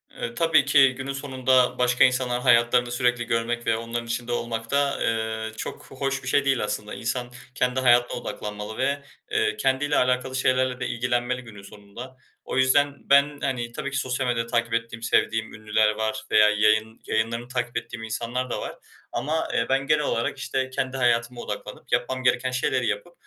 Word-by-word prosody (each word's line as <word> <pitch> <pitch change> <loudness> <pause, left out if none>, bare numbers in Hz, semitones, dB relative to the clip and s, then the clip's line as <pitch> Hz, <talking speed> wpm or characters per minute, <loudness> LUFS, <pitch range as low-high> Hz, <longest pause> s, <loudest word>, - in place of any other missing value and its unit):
E, 115 - -5
tabii 165 -4 +4
ki 135 -2 +5
günün 135 +1 -4
sonunda, 130 -2 +1
başka 125 0 +4
insanların 125 -1 +2
hayatlarını 120 0 +4
sürekli 120 -1 +1
görmek 120 0 -1
ve 115 - +3
onların 115 +1 -4
içinde 120 +1 -3
olmak 115 -1 -3
da, 140 0 +2
ııı, 110 0 -1
çok - - -6
hoş 135 0 -3
bir - - -8
şey 140 +2 +2
değil, 135 -4 +2
aslında. 105 0 -4
İnsan 120 +1 -3 0.2
kendi 125 +1 +1
hayatına 120 -1 +4
odaklanmalı 105 0 -6
ve, 140 +2 0 0.3
eee, 110 0 +1
kendiyle 135 +5 +1
alakalı 125 +1 +1
şeylerle 130 -1 +1
de 125 - -2
ilgilenmeli 120 +1 -1
günün 105 -4 -12
sonunda. 105 +6 -11 0.3
O - - -4
yüzden 140 +2 +3
ben, 140 +1 +4
hani, 120 -3 -2
tabii 140 +3 -5
ki, 140 - -2
sosyal 130 -1 -1
medyada 115 -1 0
takip 120 -1 0
ettiğim 115 0 -2
sevdiğim 110 -1 +1
ünlüler 110 0 +1
var 110 0 -2
veya 105 0 +6
yayın 110 +2 +2
yayınlarını 115 +2 -1
takip 120 -1 -3
ettiğim 115 0 -6
insanlar 120 +3 -3
da - - -3
var - - -6 0.4
ama, 160 +3 -1
eee, 115 - +1
ben 135 0 +1
genel 155 0 +3
olarak, 115 0 -1
işte, 130 -1 -2
kendi 130 0 -3
hayatıma 120 -1 +1
odaklanıp - - -7
yapmam 130 0 0
gereken 125 +1 +2
şeyleri 130 -1 0
yapıp 110 +12 -3
125 Hz, 180 wpm, -25 LUFS, 115-130 Hz, 0.4 s, veya